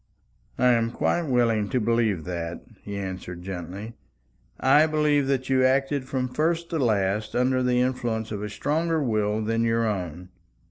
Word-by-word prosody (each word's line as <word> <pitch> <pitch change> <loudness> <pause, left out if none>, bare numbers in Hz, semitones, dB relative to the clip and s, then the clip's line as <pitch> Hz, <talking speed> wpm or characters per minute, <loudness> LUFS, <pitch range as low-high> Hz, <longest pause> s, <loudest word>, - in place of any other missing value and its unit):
"I 125 - +4
am 115 -1 +2
quite 165 +6 0
willing 115 -5 +2
to 130 - +1
believe 110 -6 +1
that," 85 -1 -5 0.2
he 100 -1 -6
answered 90 -2 -6
gently. 95 +4 -6 0.7
"I 145 +4 +5
believe 150 -2 +2
that 130 -2 0
you 130 -1 +3
acted 135 +1 +2
from 130 -1 -2
first 165 +5 -1
to 165 - -1
last 105 -1 0
under 130 +1 +2
the 125 -1 +2
influence 120 -4 -1
of 105 -2 -4
a 105 - -4
stronger 160 +7 0
will 110 -3 0
than 115 +1 0
your 115 0 +1
own. 90 -3 -4
115 Hz, 165 wpm, -25 LUFS, 105-130 Hz, 0.7 s, I